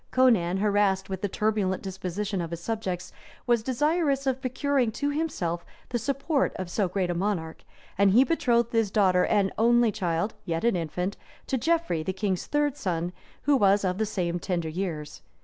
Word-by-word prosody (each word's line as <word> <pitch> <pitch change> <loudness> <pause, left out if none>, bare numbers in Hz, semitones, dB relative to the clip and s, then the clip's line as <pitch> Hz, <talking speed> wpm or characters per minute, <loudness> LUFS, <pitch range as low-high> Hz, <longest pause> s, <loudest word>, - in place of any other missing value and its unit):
Conan, 215 -9 +3
harassed 200 -1 +1
with 190 -1 -3
the 205 - 0
turbulent 210 -2 0
disposition 190 +1 -3
of 165 - -4
his 170 0 -5
subjects, 185 -3 -4 0.3
was 240 -2 +3
desirous 280 +3 +1
of 265 -1 0
procuring 265 -2 0
to 285 +5 -1
himself 190 - -2 0.3
the 240 - -1
support 275 +2 0
of 185 -2 -5
so 200 0 +1
great 185 -1 -1
a - - 0
monarch; 170 -3 -2 0.4
and 200 0 +6
he 230 +7 +6
betrothed 240 -7 +1
his 225 -3 +2
daughter 190 -3 +3
and 200 -2 +2
only 235 0 +4
child, 180 -1 -1
yet 165 -1 -2
an 235 -3 +3
infant, 180 +3 -2 0.3
to - - -1
Geoffrey, 320 - +1
the 185 +4 -2
king's 190 -1 -2
third 295 -1 0
son, 175 - -2 0.3
who 290 0 +4
was 200 -4 +4
of 180 +1 -1
the 220 - +1
same 175 -4 -2
tender 170 -3 -2
years. 155 -4 -4
205 Hz, 180 wpm, -27 LUFS, 180-245 Hz, 0.4 s, and